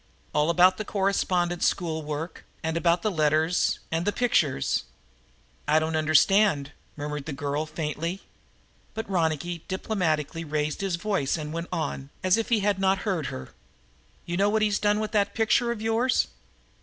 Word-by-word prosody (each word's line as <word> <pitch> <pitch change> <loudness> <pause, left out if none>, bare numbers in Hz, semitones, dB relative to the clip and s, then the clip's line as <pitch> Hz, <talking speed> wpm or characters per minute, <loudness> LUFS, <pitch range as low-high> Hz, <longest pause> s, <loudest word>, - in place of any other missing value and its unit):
All 150 +2 +2
about 180 +2 +5
the 215 - -3
correspondence 185 -4 +1
school 160 -4 -1
work 155 +2 -5 0.2
and 160 0 -1
about 170 0 +2
the 215 - +1
letters 155 +1 +2
and 165 - +1
about 170 - -4
the - - -7
pictures." 155 - +1 0.8
"I 150 +1 +4
don't 160 +1 0
understand," 155 0 +3 0.3
murmured 150 -1 -4
the 155 - -3
girl 145 +2 -2
faintly. 165 +4 -4 0.7
But 220 0 -4
Ronicky 170 -2 -1
diplomatically 165 -5 -1
raised 150 0 -2
his 195 -3 0
voice 180 -6 -1
and 155 -1 -5
went 170 +1 -4
on, 155 -5 -3
as 185 0 +4
if 225 0 -2
he 230 -3 +3
had 200 -1 +1
not 195 +1 +1
heard 180 -8 -1
her. 65 0 -7 0.8
"You 175 0 -3
know 200 +1 +3
what 215 +1 +2
he's 210 -1 +2
done 210 0 +2
with 215 0 -2
that 200 -2 +1
picture 225 +2 +2
of 220 -2 -5
yours?" 230 +3 +2
170 Hz, 170 wpm, -26 LUFS, 155-200 Hz, 0.8 s, about